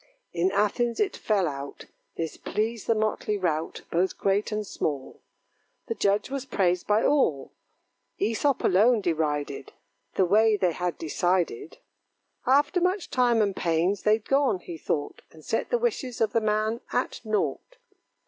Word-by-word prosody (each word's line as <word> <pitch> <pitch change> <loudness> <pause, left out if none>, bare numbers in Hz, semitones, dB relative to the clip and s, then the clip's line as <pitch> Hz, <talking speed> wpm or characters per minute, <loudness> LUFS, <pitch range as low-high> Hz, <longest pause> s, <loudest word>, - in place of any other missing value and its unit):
In 175 +2 +1
Athens 210 +4 0
it 405 -3 +1
fell 200 -5 +1
out, 140 -1 -6 0.3
This 165 -1 -3
pleased 220 +1 -3
the 230 - +3
motley 215 -1 -1
rout, 165 -4 -2
Both 180 +3 +1
great 200 +2 0
and 210 0 -2
small. 145 -8 -4 0.6
The 230 - -2
judge 205 +2 0
was 275 -2 -3
praised 180 -9 0
by 210 +2 +3
all; 160 - +2 0.7
Æsop 230 +6 +1
alone 215 +5 +4
derided 150 -5 -2 0.4
The 190 - +3
way 215 +3 +4
they 180 -3 +2
had 175 0 -3
decided. 170 -3 -1 0.7
After 285 +7 +3
much 365 +1 0
time 240 -3 +3
and 200 -2 -1
pains, 175 +3 +1
they'd 215 0 +2
gone, 275 -7 +3
he 170 - -7
thought, 150 -2 -3
And 155 -1 -17
set 225 - -1
the 485 - +2
wishes 410 - -2
of 220 -2 +1
the 230 - +2
man 215 +2 0
at 250 - -1
nought. 220 - -2
210 Hz, 150 wpm, -26 LUFS, 175-230 Hz, 0.7 s, alone